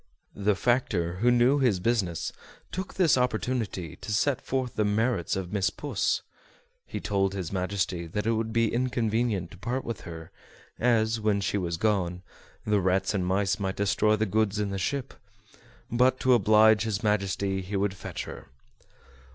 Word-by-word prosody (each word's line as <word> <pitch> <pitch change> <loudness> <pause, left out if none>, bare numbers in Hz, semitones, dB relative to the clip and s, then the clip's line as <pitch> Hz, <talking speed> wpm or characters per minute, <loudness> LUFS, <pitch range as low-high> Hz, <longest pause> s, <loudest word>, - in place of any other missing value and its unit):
The 105 0 +1
factor, 95 -7 0
who 120 +6 +3
knew 125 +4 +4
his 120 -9 +2
business, 95 -5 -1 0.4
took 185 0 -5
this 165 -8 +4
opportunity 110 -8 -2
to - - -7
set 130 +5 +1
forth 130 -2 -2
the 105 - +2
merits 105 -2 0
of 95 -1 -4
Miss 95 -2 +2
Puss. 145 +9 -1 0.6
He - - -5
told 95 -1 0
his 90 -4 -4
Majesty 95 -2 -2
that 105 +6 -3
it 115 - +2
would 110 0 -1
be 115 -1 +1
inconvenient 115 -6 0
to 95 - -12
part 125 +6 -3
with 115 -3 -4
her, 80 -1 -9 0.5
as, 115 -2 +2
when 105 -2 +1
she 100 +1 -1
was 85 -2 -2
gone, 90 -3 0 0.4
the 105 -2 +2
rats 95 +2 +1
and 100 -3 0
mice 100 +2 +1
might 95 -1 -2
destroy 105 +1 +2
the 110 +1 0
goods 110 0 +1
in 105 -1 -1
the 100 - -3
ship 135 +7 -2 0.8
but 125 +2 +3
to 130 - +4
oblige 110 -1 +5
his 110 -1 -2
Majesty 100 -2 0
he 95 +2 -5
would 100 0 +1
fetch 100 - -6
her. - - -10
105 Hz, 170 wpm, -27 LUFS, 95-115 Hz, 0.8 s, oblige